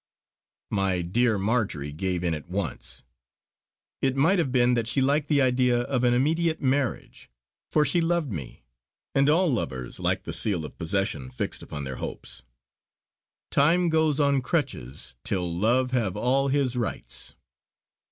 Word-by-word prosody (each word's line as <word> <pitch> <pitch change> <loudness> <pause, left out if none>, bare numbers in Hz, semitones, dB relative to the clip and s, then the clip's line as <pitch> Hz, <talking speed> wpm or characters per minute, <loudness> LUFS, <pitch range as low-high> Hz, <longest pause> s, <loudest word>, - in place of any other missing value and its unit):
My 95 -3 0
dear 110 +5 +1
Marjory 100 - -1
gave 90 +2 -2
in 85 -2 +1
at 75 +2 -7
once. 90 -7 -4 1.0
It 135 -1 +1
might 165 +8 +3
have 140 -6 0
been 125 -1 +4
that 115 -2 0
she 125 - +2
liked 140 +3 +2
the 145 -3 +3
idea 125 -1 +2
of 125 0 -1
an 120 - +4
immediate 160 +5 +1
marriage; 135 -1 -2 0.4
for 150 - +3
she 170 +5 +3
loved 165 -5 0
me, 70 -8 -7 0.5
and 140 +1 +3
all 165 -1 +3
lovers 65 - -4
like - - 0
the - - -5
seal 90 -8 +3
of 75 - -10
possession 80 -6 -1
fixed 65 - -3
upon 75 -1 -6
their 65 -1 -5
hopes: - - -6 1.1
"Time 170 +5 +3
goes 160 -2 +2
on 140 -2 +3
crutches, 130 - -3
till 90 -3 -1
love 120 +7 +2
have 110 -7 0
all 130 +5 +2
his 135 -2 +1
rites." 120 -3 -3
125 Hz, 150 wpm, -26 LUFS, 90-140 Hz, 1.1 s, been